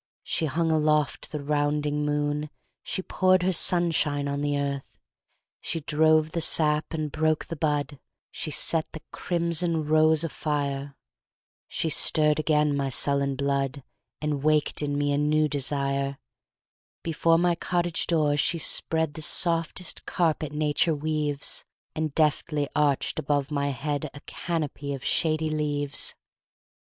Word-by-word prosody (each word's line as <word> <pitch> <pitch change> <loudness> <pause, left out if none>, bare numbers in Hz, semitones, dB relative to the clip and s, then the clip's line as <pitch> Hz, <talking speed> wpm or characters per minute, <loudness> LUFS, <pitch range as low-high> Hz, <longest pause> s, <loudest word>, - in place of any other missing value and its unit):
She 160 - -1
hung 160 +3 0
aloft 150 -1 +1
the 150 -2 -5
rounding 150 0 0
moon, 150 0 -1 0.3
She 190 - -3
poured 185 -1 +2
her 185 - +2
sunshine 160 -5 +2
on 140 0 -2
the 145 0 0
earth, 140 -1 -4 0.6
She 165 - -3
drove 155 +1 +3
the 170 - -2
sap 150 -1 +2
and 155 -2 -3
broke 155 0 0
the 165 - -6
bud, 145 -2 -1 0.3
She - - -4
set 155 +2 +1
the 160 - -9
crimson 170 -2 0
rose 155 +1 +4
afire. 140 -3 -3 0.7
She 160 - -2
stirred 150 0 +3
again 150 -1 +2
my 140 -1 -1
sullen 140 +1 0
blood, 140 0 -1 0.4
And 150 -2 -2
waked 150 0 +1
in 145 -1 -1
me 145 0 0
a 140 - +1
new 150 +1 +2
desire. 140 -1 0 0.9
Before 165 0 +2
my 175 +1 +2
cottage 175 0 -1
door 150 -3 +2
she 170 +3 +1
spreadThe 160 -1 0
softest 165 +2 0
carpet 160 -4 0
nature 150 +2 +1
weaves, 150 -1 -2 0.3
And 155 -2 -3
deftly 150 -1 +1
arched 145 -2 +1
above 145 0 -1
my 140 -1 0
headA 145 +2 -3 0.2
canopy 150 -4 -4
of 135 - -10
shady 155 -1 +1
leaves. 145 -2 +1
150 Hz, 135 wpm, -26 LUFS, 145-160 Hz, 0.9 s, rose